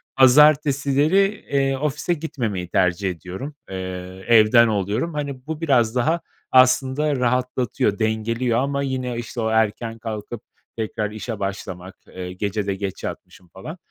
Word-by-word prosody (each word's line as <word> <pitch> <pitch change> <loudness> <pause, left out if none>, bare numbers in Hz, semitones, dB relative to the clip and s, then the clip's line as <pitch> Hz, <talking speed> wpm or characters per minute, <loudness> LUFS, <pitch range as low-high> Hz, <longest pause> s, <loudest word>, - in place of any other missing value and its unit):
Pazartesileri, 145 +3 +5 0.3
eee, 135 -1 +1
ofise 150 +4 -1
gitmemeyi 120 - -3
tercih 90 +1 +1
ediyorum, 95 - -7
eee, 95 - -6 0.5
evden 115 +1 +6
oluyorum. 105 - -1
Hani, 140 -3 -5
bu 160 0 -5
biraz 125 -7 +2
daha 160 +7 +1 0.3
aslında 130 +3 +4
rahatlatıyor, 125 -4 0
dengeliyor 115 +2 0
ama 140 +1 -1
yine, 130 -3 -3
işte, 120 0 -5
o 110 - 0
erken 110 +1 0
kalkıp 110 0 -6 0.4
tekrar 105 -1 -3
işe 110 0 -6
başlamak, 95 -1 -5
eee, 90 0 -7
gece 100 +1 -3
de 100 - 0
geç 95 -1 -5
yatmışım 90 - -8
falan 95 - -9
120 Hz, 135 wpm, -22 LUFS, 105-140 Hz, 0.5 s, evden